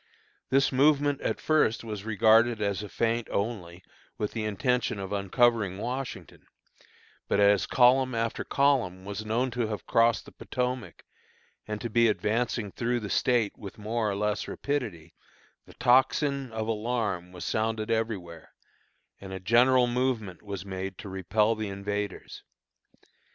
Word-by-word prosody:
This 135 +1 +3
movement 145 +1 +3
at - - -2
first 155 -8 +2
was 105 -3 -6
regarded 110 +1 +4
as 100 -1 -1
a 105 - -7
feint 115 +5 -1
only, 95 -5 -3 0.3
with 105 - -2
the 110 -2 -3
intention 110 +3 0
of 95 0 -5
uncovering 100 0 +2
Washington; 125 +4 -6 0.8
but - - +1
as 100 -1 +4
column 130 0 +4
after 115 0 -1
column 120 -10 +1
was 100 +2 -5
known 120 +4 0
to 120 -1 -1
have 105 -1 -5
crossed 115 0 +3
the - - -13
Potomac, 125 -1 -4 0.6
and 105 -1 -4
to 120 - -2
be 115 +1 +4
advancing 110 0 -1
through 120 +3 -1
the 100 -3 -6
State 120 -5 +1
with 100 -3 -10
more 110 +1 -1
or 100 - -2
less 105 +1 -1
rapidity, 110 - -4 0.5
the - - -15
tocsin 135 +1 +2
of 110 0 -3
alarm 110 -5 -2
was 90 -1 -8
sounded 110 0 -1
everywhere, 100 -8 -3 0.7
and 95 -1 -9
a 95 - -5
general 125 +6 +4
movement 120 -6 -1
was 100 -3 -6
made 95 -1 -5
to 100 - -8
repel 105 +4 +1
the 110 -1 -4
invaders. 100 0 -5
110 Hz, 145 wpm, -28 LUFS, 100-120 Hz, 0.8 s, regarded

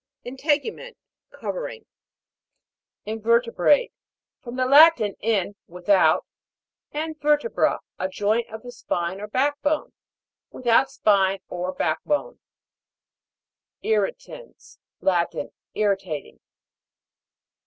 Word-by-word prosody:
INTE'GUMENT. 300 - -2 0.3
Covering. - - -6 1.2
INVE'RTEBRATE. 230 +3 +2 0.5
From 240 -1 -8
the 255 0 +1
Latin, 275 -6 +6
in, 205 -3 0
without, 180 +3 +3 0.7
and 310 +1 -4
vertebra, 295 +8 +2 0.2
a 185 - -1
joint 210 +4 0
of 220 +1 -9
the 245 - -8
spine 185 -5 -3
or 210 - -5
back 285 +6 0
bone. 295 +1 -1 0.6
Without 255 +2 +2
spine 195 -2 +2
or 180 +1 -3
back 160 -3 -1
bone. 300 +12 -2 1.4
IR'RITANS. 220 - -3 0.2
Latin. 175 -3 0 0.2
Irritating. 195 -8 -2
230 Hz, 90 wpm, -24 LUFS, 195-290 Hz, 1.4 s, Latin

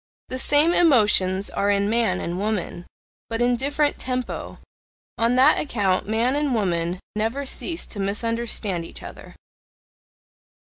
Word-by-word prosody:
The 255 - -3
same 295 +5 +4
emotions 210 - +3
are 200 - 0
in 200 0 +2
man 220 -4 +1
and 175 +2 -4
woman, 200 -4 -3 0.4
but 230 0 -2
in 245 0 +3
different 290 +3 0
TEMPO, 255 -1 -4 0.6
on 230 +2 +2
that 265 +4 +5
account 200 -9 0
man 235 +5 +1
and 290 -3 0
woman 175 -4 -1 0.2
never 225 +6 -1
cease 330 +5 -4
to 205 - -9
misunderstand 210 -2 -2
each - - -11
other. - - -11
225 Hz, 135 wpm, -23 LUFS, 200-260 Hz, 0.6 s, that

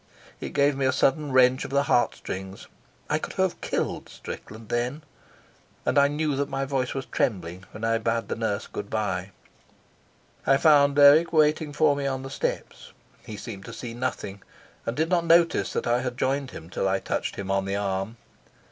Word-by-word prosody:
It - - -6
gave 140 0 +3
me 135 -1 +1
a - - +3
sudden 140 +3 +1
wrench 130 0 +4
of - - -6
the 140 +1 +2
heart 120 - +2
strings. 95 +1 -7 0.4
I - - +1
could - - -6
have - - 0
killed - - -2
Strickland 110 +1 -9
then, 125 +6 -1 0.8
and - - +1
I 140 - +6
knew 150 0 -1
that 140 0 -1
my 135 0 -2
voice 135 -2 -1
was 135 -1 -3
trembling 90 -4 -2
when 110 - -10
I 115 0 +2
bade 115 +1 -1
the - - -2
nurse 110 -3 -2
good 100 - -7
bye. 95 -4 -2 1.2
I 135 - +6
found 140 -2 +5
Dirk 145 +3 +7
waiting 155 -1 +3
for 150 0 +3
me 140 -1 -2
on 130 -1 -2
the 135 - -7
steps. - - -4 0.3
He 105 - -6
seemed 100 -3 -8
to 115 - -8
see 115 0 -6
nothing, 115 -5 -4 0.5
and 115 - -2
did 160 +1 +1
not 175 -2 +2
notice 170 0 +4
that - - -2
I 120 +1 +2
had 125 -1 -4
joined 135 0 0
him 85 -7 -10
till 95 - -1
I 95 0 +2
touched - - -3
him 95 -1 -4
on 95 0 +1
the 100 0 -2
arm. 100 +2 -2
130 Hz, 195 wpm, -26 LUFS, 105-140 Hz, 1.2 s, Dirk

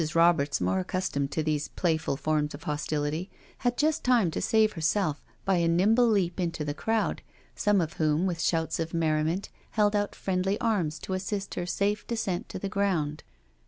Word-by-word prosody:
Roberts, 165 -4 +4
more 95 +1 +1
accustomed 140 - -1
to 155 +2 -1
these 150 -1 0
playful 160 -5 -1
forms 150 -1 0
of 145 - -12
hostility, 150 +3 -2 0.3
had 245 -1 0
just 310 +1 +1
time 235 -9 +3
to - - -3
save 220 +1 +3
herself 160 -1 0 0.2
by 195 -2 +3
a 170 -1 +2
nimble 210 +8 +4
leap 190 -6 +1
into 170 -4 -1
the 145 - -2
crowd, 220 +7 -1 0.3
some 205 -1 +3
of 160 -3 -1
whom, 155 +2 +1
with 175 -3 -1
shouts 160 -1 0
of 165 0 -3
merriment, 160 +3 0 0.3
held 210 0 +4
out 205 0 0
friendly 190 +1 -1
arms 200 -10 0
to 190 - -5
assist 195 +1 -3
her 175 - -3
safe 200 +4 0
descent 205 -6 -2
to - - -5
the 195 - -3
ground. 185 -7 0
175 Hz, 180 wpm, -28 LUFS, 155-205 Hz, 0.3 s, Roberts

